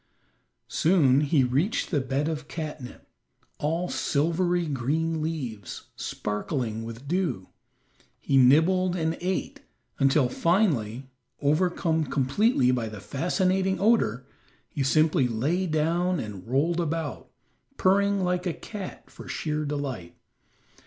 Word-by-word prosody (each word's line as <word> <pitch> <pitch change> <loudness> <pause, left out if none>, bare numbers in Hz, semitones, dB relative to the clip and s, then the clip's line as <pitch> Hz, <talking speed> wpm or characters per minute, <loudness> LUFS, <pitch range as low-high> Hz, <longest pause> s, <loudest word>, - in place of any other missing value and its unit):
Soon 145 -6 +3
he 145 -2 +3
reached 145 - 0
the 145 -5 +2
bed 135 +3 -1
of 155 -2 -4
catnip, 155 -6 -7 0.5
all 165 +4 -1
silvery 170 +4 0
green 155 +4 -1
leaves, 130 - -5
sparkling 110 +1 -3
with 115 +4 -8
dew. 155 - -1 0.7
He 140 - -1
nibbled 165 +8 +4
and 160 -2 0
ate, 185 +1 -2 0.4
until 135 0 +4
finally, 135 - +1 0.3
overcome 160 +1 +1
completely 135 - +2
by 120 -3 -1
the 105 -1 -8
fascinating 185 - 0
odor, 195 - +2 0.4
he 145 - -4
simply 155 0 +3
lay 150 +11 0
down 170 +3 +1
and 105 -5 -7
rolled 155 +8 +1
about, 165 -2 -3 0.5
purring 200 +1 +3
like 180 0 0
a 170 - 0
cat 205 -4 -8
for - - -12
sheer 150 -1 -2
delight. 135 -12 -4
155 Hz, 115 wpm, -26 LUFS, 130-175 Hz, 0.7 s, nibbled